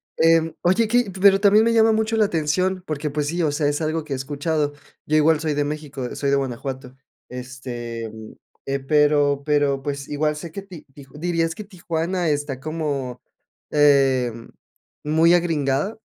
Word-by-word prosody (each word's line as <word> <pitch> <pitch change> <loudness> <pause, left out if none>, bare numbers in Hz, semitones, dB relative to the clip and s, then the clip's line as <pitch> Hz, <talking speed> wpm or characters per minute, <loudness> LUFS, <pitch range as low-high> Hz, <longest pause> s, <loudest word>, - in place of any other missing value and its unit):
Em, 165 0 +3
oye, 190 +6 +2
que 240 -3 +1
pero 195 -1 +6
también 210 +2 +5
me 230 - +2
llama 225 0 +5
mucho 220 +1 0
la 220 - +4
atención, 185 +2 0
porque 150 -1 -3
pues 145 0 -2
sí, 170 +2 -1
o 150 - +1
sea, 145 0 0
es 145 +2 -1
algo 155 0 -2
que 140 - -4
he - - 0
escuchado. 145 +2 -2 0.3
Yo 155 +1 +2
igual 155 0 +3
soy 155 -2 -1
de 145 0 0
México, 145 -4 -5
soy 140 - -1
de 140 - +3
Guanajuato. 130 0 -5 0.3
Este, 125 -3 -6 0.6
eh, 140 0 -1
pero 145 0 +2
pero 145 -2 +1
pues 140 -1 -4
igual 150 +1 -1
sé 165 +1 -8
que 200 - -5
ti 185 -5 -12
tij 140 -2 -13
¿dirías 165 -1 0
que 210 - -9
Tijuana 175 -2 -2
está 145 -3 -2
como, 145 -5 -3 0.5
eh, 135 -4 +4 0.7
muy 160 +3 +4
agringada? 160 +2 0
150 Hz, 170 wpm, -22 LUFS, 140-170 Hz, 0.7 s, pero